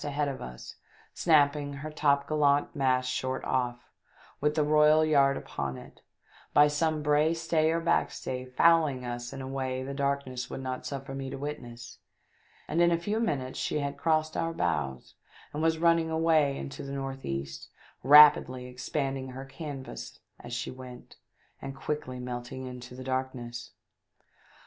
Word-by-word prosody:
2,75 - - -4
ahead 145 0 -1
of 135 -2 -5
us, 60 0 -9 0.4
snapping 145 -3 +3
her 145 +2 -6
topgallant 145 0 +2
mast 130 -2 +2
short 130 0 -2
off, 125 -1 -2 0.5
with 150 +1 +1
the 155 - +3
royal 155 +1 +5
yard 140 -3 +4
upon 70 -1 -4
it, - - -13 0.5
by 145 0 +8
some 155 +1 0
brace, 155 +3 +2
stay 160 -1 +2
or 165 - +1
backstay 130 -5 -1
fouling 150 -3 +3
us 120 0 -5
in 135 - -6
a - - -6
way 130 -1 -3
the 140 +1 -5
darkness 140 -2 -2
would - - -5
not 130 -1 -4
suffer 135 -1 -6
me 135 0 -5
to - - -6
witness, 120 -5 -7 0.7
and 170 - +1
in 170 - +6
a 170 - +3
few 205 +6 -2
minutes 135 - -2
she - - -1
had 140 -1 -2
crossed 155 -1 0
our 165 0 -1
bows 65 - -2 0.4
and 150 - -3
was 160 0 +2
running 165 0 +3
away 160 -3 +2
into 140 - -6
the 140 - -7
north 135 -1 -5
east, 70 0 -5 0.3
rapidly 140 -2 +7
expanding 135 +1 -3
her 130 +1 -7
canvas 135 - -8 0.2
as 120 - -10
she 120 0 -3
went, 125 -1 -11 0.4
and 135 - -6
quickly 135 -2 -4
melting 125 +1 -6
into 125 -1 -9
the 130 - -8
darkness. 125 -2 -4
140 Hz, 160 wpm, -29 LUFS, 130-150 Hz, 0.7 s, by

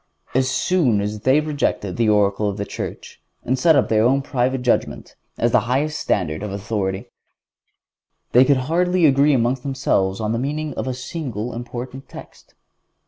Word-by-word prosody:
As 130 0 +2
soon 130 - +1
as 105 +1 -3
they 130 +7 +3
rejected 145 -10 -2
the 115 -2 +1
oracle 105 0 +2
of 100 - -5
the 100 - -3
Church, - - -7 0.2
and 130 +1 -1
set 160 +3 +5
up 140 - +3
their 110 -1 +2
own 135 +3 +2
private 130 0 -1
judgment 125 - -1 0.2
as 120 +1 +1
the 125 - +5
highest 150 +4 0
standard 80 -4 -1
of 105 -1 -4
authority, 100 -1 -3 1.2
they 125 - +7
could 140 0 +3
hardly 180 +3 +2
agree 140 0 +4
among 120 +1 +1
themselves 125 -8 0
on 110 -1 -1
the 115 - -1
meaning 150 +3 -3
of - - -4
a 130 - -2
single 125 -4 -5
important 125 +2 -7
text. - - -13
125 Hz, 170 wpm, -21 LUFS, 105-140 Hz, 1.2 s, they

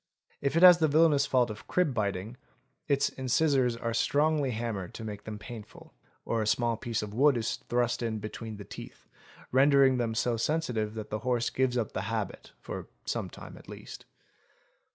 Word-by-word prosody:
If 140 +3 0
it 170 - +4
has 180 -1 +10
the 160 - +4
villainous 150 -2 +4
fault 125 -3 +2
of 105 - -10
crib 180 -5 +2
_ - - -6
biting, 100 0 -2 0.5
its 140 -2 +2
incisors 130 -1 +1
are 115 0 -3
strongly 145 +3 +2
hammered 110 -6 -4
to 115 - -7
make 105 -2 -7
them 110 -1 -6
painful; 110 0 -11 0.3
or 115 -1 0
a 105 - -1
small 120 +1 +2
piece 115 -1 -3
of 105 -1 -7
wood 135 +3 +4
is 115 - -2
thrust 120 0 +1
in 115 -2 -1
between 110 +1 -7
the 100 - -9
teeth, - - -11 0.4
rendering 135 0 +5
them 115 -2 -1
so 115 +1 +1
sensitive 115 -6 -1
that 110 -1 -7
the 110 - -2
horse 120 -1 0
gives 130 -1 +1
up 115 -4 -1
the - - -3
habit 110 -4 -4
for - - -7 0.2
some - - -2
time - - -11
at - - -16
least. - - -10
120 Hz, 190 wpm, -29 LUFS, 110-140 Hz, 0.5 s, has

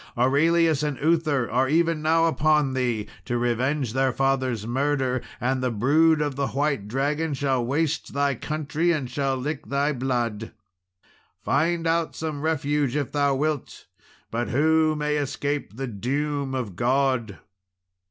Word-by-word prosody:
Aurelius 155 +4 +3
and 150 -3 -2
Uther 155 -5 +1
are 130 +3 +2
even 165 0 +2
now 165 +1 +3
upon 155 -4 +2
thee 120 -5 -1 0.2
to 120 - -1
revenge 120 +2 0
their 135 0 +2
father's 130 -4 0
murder; 130 0 0 0.2
and 130 +1 0
the 130 - +1
brood 150 +8 +3
of 145 -2 -3
the 140 0 -1
white 140 -6 -1
dragon 145 +6 -1
shall 130 -2 0
waste 150 +5 -1
thy 140 0 +1
country, 155 +5 -1
and 140 -7 -2
shall 135 0 0
lick 145 +3 -4
thy 140 +2 0
blood. 120 -4 -2 0.9
Find 165 +3 +1
out 165 0 0
some 155 -3 -4
refuge, 145 -3 0
if 145 -3 -1
thou 140 -2 +2
wilt! 150 0 -3 0.5
but 120 +1 -2
who 155 +4 +3
may 150 0 -1
escape 145 -3 -3
the 135 - -3
doom 135 +5 -2
of 115 -8 -4
God?" 125 -2 0
140 Hz, 145 wpm, -25 LUFS, 130-150 Hz, 0.9 s, Aurelius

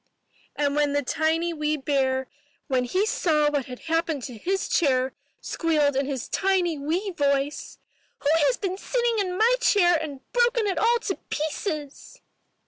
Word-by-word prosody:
'' - - -34
And 285 -1 0 0.2
the 285 - +1
tiny 320 +5 0
wee 305 -1 -1
bear, 265 -2 0 0.4
when 255 -3 0
he 370 - +1
saw 305 -8 +2
what 285 -3 -1
had 250 -1 -9
happened 325 -4 -1
to 250 - -6
his 380 - -2
chair, 260 -5 +1 0.3
squealed 305 -4 +1
in 270 0 0
his 270 -4 -4
tiny 375 -4 +1
wee 345 +8 -1
voice, 280 -3 -1 0.4
'Who 285 - +1 0.2
has - - +1
been 380 -1 -3
sitting 475 -1 0
in 365 -2 -1
my 465 +4 +4
chair 390 -7 +4
and 300 -4 -4
broken 480 -2 +2
it 390 -2 0
all 470 +2 +4
to 385 - -3
pieces?' 305 -1 -4
315 Hz, 160 wpm, -25 LUFS, 280-380 Hz, 0.4 s, my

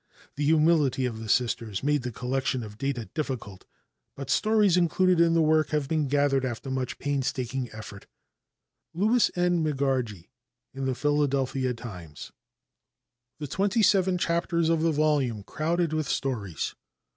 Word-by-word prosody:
The 145 - -2
humility 150 -4 +3
of 115 -3 -3
the 110 -1 -7
Sisters 115 -3 0
made 145 0 +2
the 125 0 -4
collection 130 +1 -2
of 105 0 -10
data 135 -4 -2
difficult, 130 - -5 0.5
but 140 -1 -5
stories 215 -4 +3
included 180 0 +3
in 165 0 +4
the 165 - +4
work 155 0 +3
have 150 -3 -1
been 155 -1 0
gathered 140 -1 +2
after 130 +1 -4
much 130 -1 -3
painstaking 130 -2 -2
effort. 110 -2 -10 0.9
Louis 220 +6 +3
N. 175 -1 +2
Megargee 130 - -1 0.4
in 135 0 -4
the 130 - 0
Philadelphia 135 -3 0
Times. 90 -10 -9 1.1
"The 150 - -5
Twenty 200 - +1
Seven 190 -2 +3
Chapters 170 -1 0
of 165 -1 +2
the 165 0 +2
Volume 145 -8 +1
Crowded 165 - -1
With 155 -3 -1
Stories." 105 - -2
140 Hz, 145 wpm, -27 LUFS, 125-165 Hz, 1.1 s, in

